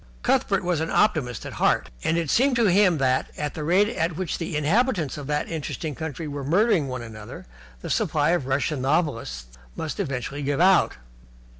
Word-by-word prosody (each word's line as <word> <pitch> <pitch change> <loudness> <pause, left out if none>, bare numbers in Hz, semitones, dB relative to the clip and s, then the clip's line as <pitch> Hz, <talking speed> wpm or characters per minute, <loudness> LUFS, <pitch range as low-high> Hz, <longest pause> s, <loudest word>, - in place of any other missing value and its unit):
Cuthbert - - +2
was 175 -3 0
an 160 +1 -2
optimist 140 - +1
at - - -6
heart, - - +2
and 165 - +1
it 165 -4 -1
seemed 265 +1 +3
to 235 -2 +3
him 185 -3 +4
that, 130 -1 +1
at 150 -1 -3
the 155 - -5
rate 185 +6 +3
at 170 -7 -1
which 180 -2 -3
the 165 -3 -3
inhabitants 175 - +1
of 145 -2 -7
that 150 0 -1
interesting 155 -1 -4
country 160 +2 -5
were 145 -1 -5
murdering 175 - +2
one 125 -2 -5
another, 110 -2 -10 0.4
the - - -5
supply 150 +1 +1
of 170 -7 0
Russian 140 +1 0
novelists 115 - -1 0.2
must 160 +3 -5
eventually 140 - -3
give 145 +1 -1
out. 185 +1 +4
155 Hz, 185 wpm, -24 LUFS, 135-175 Hz, 0.4 s, him